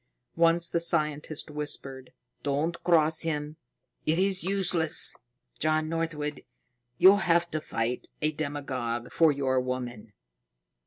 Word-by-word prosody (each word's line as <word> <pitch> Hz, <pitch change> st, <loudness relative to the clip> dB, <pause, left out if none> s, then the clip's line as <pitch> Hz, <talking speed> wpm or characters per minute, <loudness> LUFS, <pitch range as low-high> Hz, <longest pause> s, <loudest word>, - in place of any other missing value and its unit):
Once 170 Hz, 0 st, +3 dB
the 170 Hz, -, 0 dB
scientist 155 Hz, -2 st, -1 dB
whispered: 140 Hz, -3 st, -4 dB, 0.3 s
"Don't 150 Hz, +4 st, -2 dB
cross 160 Hz, -2 st, +3 dB
him; 150 Hz, -1 st, -3 dB, 0.5 s
it 160 Hz, +1 st, +2 dB
is 190 Hz, -1 st, +1 dB
useless. 180 Hz, -4 st, +4 dB, 0.4 s
John 155 Hz, 0 st, 0 dB
Northwood, 155 Hz, -3 st, -3 dB, 0.5 s
you'll 190 Hz, +3 st, +7 dB
have 170 Hz, -2 st, +1 dB
to 155 Hz, -, -2 dB
fight 115 Hz, -2 st, -3 dB
a 155 Hz, 0 st, 0 dB
demigod 130 Hz, -6 st, -4 dB
for 165 Hz, -2 st, +4 dB
your 135 Hz, -2 st, 0 dB
woman!" 125 Hz, -4 st, -5 dB
155 Hz, 115 wpm, -27 LUFS, 140-165 Hz, 0.5 s, you'll